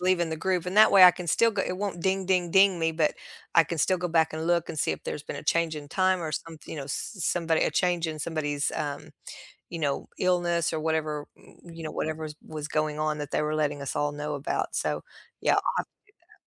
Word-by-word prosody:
leaving 180 Hz, -2 st, +1 dB
the 160 Hz, -, -2 dB
group. 180 Hz, +1 st, -1 dB
And 185 Hz, +3 st, -3 dB
that 215 Hz, 0 st, +8 dB
way 190 Hz, -2 st, +9 dB
I 180 Hz, -, +11 dB
can 180 Hz, 0 st, -8 dB
still 230 Hz, +8 st, +3 dB
g 200 Hz, -2 st, 0 dB
it 180 Hz, -, -3 dB
won't 195 Hz, -3 st, -3 dB
ding 190 Hz, 0 st, 0 dB
ding 180 Hz, -2 st, +1 dB
ding 190 Hz, -1 st, +5 dB
me, 165 Hz, 0 st, +1 dB
but 155 Hz, -1 st, +1 dB, 0.4 s
I 165 Hz, -1 st, +7 dB
can 165 Hz, +2 st, -5 dB
still 185 Hz, +4 st, +2 dB
go 180 Hz, -, -2 dB
back 160 Hz, -1 st, +2 dB
and 160 Hz, +1 st, -4 dB
look 170 Hz, -1 st, +1 dB
and 155 Hz, -, -5 dB
see -, -, +1 dB
if -, -, -8 dB
there's 150 Hz, -, -4 dB
been -, -, -6 dB
a -, -, -7 dB
change 165 Hz, 0 st, +1 dB
in 145 Hz, -1 st, -8 dB
time 185 Hz, +2 st, +2 dB
or 155 Hz, -2 st, -4 dB
somethi 160 Hz, 0 st, -7 dB
you -, -, -6 dB
know, 140 Hz, -, -4 dB
s 205 Hz, -, -4 dB
somebody 165 Hz, 0 st, +1 dB
a -, -, +2 dB
change 175 Hz, -2 st, +1 dB
in 155 Hz, -1 st, -5 dB
somebody's, 145 Hz, -2 st, -2 dB
um, 145 Hz, -1 st, -4 dB, 0.6 s
you 165 Hz, -, -5 dB
know, 140 Hz, -3 st, -1 dB
illness 175 Hz, -2 st, +1 dB
or 155 Hz, -, -1 dB
whatever, 155 Hz, -2 st, -1 dB
m -, -, -19 dB, 0.2 s
you 165 Hz, -, -9 dB
know, 155 Hz, -, -4 dB
whatever's 155 Hz, -1 st, -4 dB
was 150 Hz, -1 st, -5 dB
going 155 Hz, -1 st, -1 dB
on 155 Hz, 0 st, -1 dB
that 145 Hz, -1 st, -6 dB
they -, -, +1 dB
were 150 Hz, 0 st, -1 dB
letting 145 Hz, -2 st, -1 dB
us 140 Hz, -, -4 dB
all 145 Hz, 0 st, 0 dB
know 150 Hz, 0 st, -4 dB
about. 140 Hz, +1 st, -2 dB
So, -, -, -1 dB, 0.4 s
yeah, -, -, +3 dB
I'll -, -, +2 dB, 0.2 s
have -, -, 0 dB
to -, -, -57 dB, 0.3 s
do -, -, -32 dB
that. -, -, -21 dB
160 Hz, 260 wpm, -27 LUFS, 150-180 Hz, 0.6 s, I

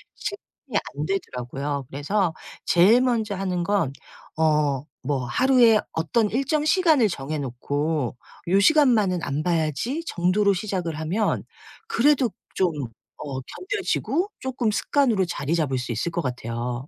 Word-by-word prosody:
실행이 290 Hz, -, -5 dB, 0.2 s
안 150 Hz, +1 st, -2 dB
되더라고요. 140 Hz, -5 st, -3 dB
그래서 165 Hz, +5 st, 0 dB, 0.3 s
제일 205 Hz, +8 st, +5 dB
먼저 225 Hz, -5 st, 0 dB
하는 185 Hz, -2 st, -2 dB
건 195 Hz, -8 st, +1 dB, 0.5 s
어 150 Hz, -3 st, +2 dB, 0.2 s
뭐 140 Hz, -3 st, 0 dB
하루에 245 Hz, -, +5 dB
어떤 205 Hz, +7 st, +1 dB
일정 275 Hz, +5 st, 0 dB
시간을 310 Hz, -, +4 dB
정해 150 Hz, -1 st, -4 dB
놓고 145 Hz, +1 st, -2 dB, 0.3 s
'요 190 Hz, +3 st, +4 dB
시간만은 220 Hz, -, +4 dB
안 145 Hz, -1 st, -2 dB
봐야지.' 175 Hz, -, -1 dB
정도로 195 Hz, -, +2 dB
시작을 180 Hz, -5 st, -3 dB
하면 185 Hz, +8 st, 0 dB, 0.4 s
그래도 270 Hz, -, +3 dB, 0.2 s
좀 185 Hz, -2 st, +2 dB, 0.5 s
어 140 Hz, -3 st, -5 dB
견뎌지고 365 Hz, -, -2 dB
쪼끔 250 Hz, -4 st, -1 dB
습관으로 230 Hz, -4 st, +2 dB
자리 165 Hz, -2 st, -2 dB
잡을 140 Hz, -6 st, 0 dB
수 125 Hz, -1 st, -4 dB
있을 120 Hz, +9 st, -1 dB
것 170 Hz, -, -1 dB
같아요. 125 Hz, 0 st, -4 dB
180 Hz, 275 characters per minute, -24 LUFS, 145-235 Hz, 0.5 s, 제일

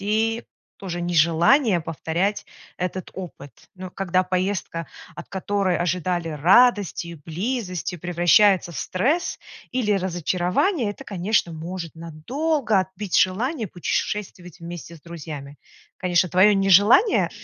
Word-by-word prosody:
и 220 Hz, +3 st, 0 dB, 0.3 s
тоже 175 Hz, -3 st, -5 dB
нежелание 175 Hz, -, +3 dB
повторять 170 Hz, +5 st, -2 dB, 0.3 s
этот 180 Hz, +1 st, -4 dB
опыт. 170 Hz, -7 st, -9 dB, 0.2 s
Но 185 Hz, 0 st, -8 dB
когда 185 Hz, -1 st, 0 dB
поездка, 185 Hz, -3 st, -2 dB, 0.3 s
от -, -, -10 dB
которой 195 Hz, -1 st, -1 dB
ожидали 175 Hz, 0 st, -1 dB
радости 185 Hz, -, +3 dB
и 170 Hz, -, -7 dB
близости, 180 Hz, -, -4 dB
превращается 175 Hz, +2 st, +3 dB
в -, -, -6 dB
стресс, 280 Hz, -, -1 dB, 0.3 s
или 240 Hz, -5 st, 0 dB
разочарование, 185 Hz, -, 0 dB
это, -, -, -10 dB
конечно, 190 Hz, -2 st, 0 dB
может 170 Hz, +1 st, -6 dB
надолго 220 Hz, -, -1 dB
отбить 190 Hz, +1 st, -3 dB
желание 225 Hz, -, 0 dB
путешествовать 180 Hz, 0 st, -4 dB
вместе 170 Hz, 0 st, -8 dB
с -, -, -19 dB
друзьями. 150 Hz, -4 st, -8 dB, 0.4 s
Конечно, 180 Hz, 0 st, +2 dB
твое 190 Hz, +4 st, +5 dB
нежелание, 200 Hz, -, +5 dB
185 Hz, 115 wpm, -23 LUFS, 170-205 Hz, 0.4 s, твое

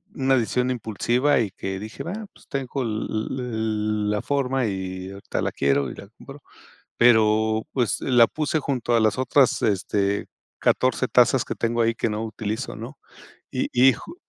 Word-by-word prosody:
una 135 Hz, 0 st, +2 dB
decisión 125 Hz, +3 st, 0 dB
impulsiva 125 Hz, +4 st, +1 dB
y 110 Hz, -5 st, -1 dB
que 95 Hz, 0 st, -5 dB
dije 110 Hz, +2 st, -7 dB
va 170 Hz, -, -5 dB, 0.2 s
pues -, -, -21 dB
tengo 135 Hz, -1 st, -3 dB
el 110 Hz, -1 st, -3 dB
el 110 Hz, -3 st, -1 dB
la 105 Hz, -, -1 dB
forma 135 Hz, -2 st, 0 dB
y 95 Hz, -1 st, -5 dB
ahorita 100 Hz, 0 st, -4 dB
la -, -, -1 dB
quiero 70 Hz, -1 st, +1 dB
y -, -, -8 dB
la 100 Hz, -, -11 dB
compro 140 Hz, +1 st, -12 dB, 0.6 s
pero 110 Hz, -2 st, +4 dB
pues 125 Hz, -4 st, 0 dB
la 120 Hz, -3 st, +5 dB
puse 155 Hz, +4 st, -1 dB
junto 125 Hz, -5 st, 0 dB
a -, -, +3 dB
las 110 Hz, +2 st, +2 dB
otras, 130 Hz, 0 st, +3 dB
este, 100 Hz, 0 st, 0 dB, 0.3 s
14 -, -, +2 dB
tazas -, -, +4 dB
que -, -, -4 dB
tengo 115 Hz, 0 st, 0 dB
ahí 115 Hz, 0 st, +2 dB
que 115 Hz, -, -1 dB
no 105 Hz, +1 st, -3 dB
utilizo, 110 Hz, +3 st, -4 dB
¿no? 120 Hz, +6 st, -9 dB, 0.5 s
Y -, -, -1 dB
y 130 Hz, +2 st, +6 dB
ju -, -, -10 dB
115 Hz, 170 wpm, -24 LUFS, 105-130 Hz, 0.6 s, y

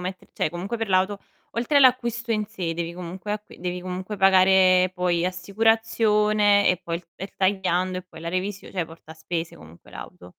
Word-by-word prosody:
metter 185 Hz, +1 st, -6 dB
cioè -, -, -1 dB
comunque 190 Hz, +8 st, -5 dB
per 225 Hz, -2 st, -3 dB
l'auto, 190 Hz, +2 st, +2 dB, 0.3 s
oltre 245 Hz, +5 st, 0 dB
all'acquisto 240 Hz, -3 st, +3 dB
in 215 Hz, -1 st, -1 dB
sé 185 Hz, -6 st, -4 dB
devi 170 Hz, +1 st, -4 dB
comunque 180 Hz, +3 st, -6 dB
acqui 210 Hz, -3 st, -8 dB
devi 180 Hz, 0 st, -4 dB
comunque 185 Hz, +3 st, -5 dB
pagare 185 Hz, -1 st, +5 dB
poi 180 Hz, -1 st, 0 dB
assicurazione 210 Hz, +1 st, +2 dB
e 185 Hz, -, +3 dB
poi 170 Hz, 0 st, -3 dB
il 170 Hz, -, -12 dB
er 195 Hz, -, -8 dB
tagliando 185 Hz, -1 st, 0 dB
e -, -, -8 dB
poi 160 Hz, -, -12 dB
la 170 Hz, 0 st, -4 dB
revisio 190 Hz, +2 st, -4 dB
cioè 180 Hz, -4 st, -2 dB
porta 160 Hz, -1 st, -13 dB
spese 165 Hz, +1 st, -5 dB
comunque 80 Hz, +2 st, -16 dB
l'auto. 90 Hz, -, -11 dB
185 Hz, 180 wpm, -24 LUFS, 175-210 Hz, 0.3 s, pagare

